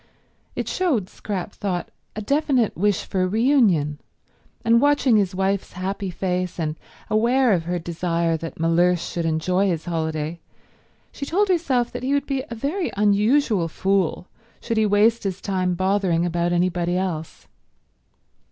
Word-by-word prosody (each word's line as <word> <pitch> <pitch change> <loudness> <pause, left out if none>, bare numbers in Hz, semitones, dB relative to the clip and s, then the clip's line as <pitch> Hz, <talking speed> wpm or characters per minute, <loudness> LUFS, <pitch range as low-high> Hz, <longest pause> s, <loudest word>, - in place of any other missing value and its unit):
It - - -3
showed, 270 - 0
Scrap 200 -1 -5
thought, 185 -4 -4 0.2
a 215 - -4
definite 275 -3 +1
wish 205 +1 +1
for 185 -1 0
reunion; 200 - +2 0.7
and 230 +1 +5
watching 285 -4 +3
his 195 -3 +1
wife's 195 +1 -1
happy 190 +2 -3
face, 180 0 -2
and 155 -2 -1 0.3
aware 235 +2 +3
of 165 -3 0
her 175 +1 -1
desire 170 0 -1
that 165 0 -8
Mellersh 170 +2 +3
should 170 0 -4
enjoy 180 +5 +1
his 165 -4 -2
holiday, 160 -1 -3 0.7
she 280 - -6
told 395 +6 +1
herself 270 -9 +1
that - - -6
he 270 +3 0
would 285 -1 0
be 270 -2 -2
a 235 - -5
very 305 - -2
unusual 210 -1 +3
fool 190 +1 0 0.3
should 230 -2 -3
he 215 -1 +3
waste 215 +3 +3
his 195 -2 -3
time 185 -3 -1
bothering 185 -2 +1
about 175 0 0
anybody 175 0 +1
else. 170 -4 -4
190 Hz, 150 wpm, -23 LUFS, 175-230 Hz, 0.7 s, and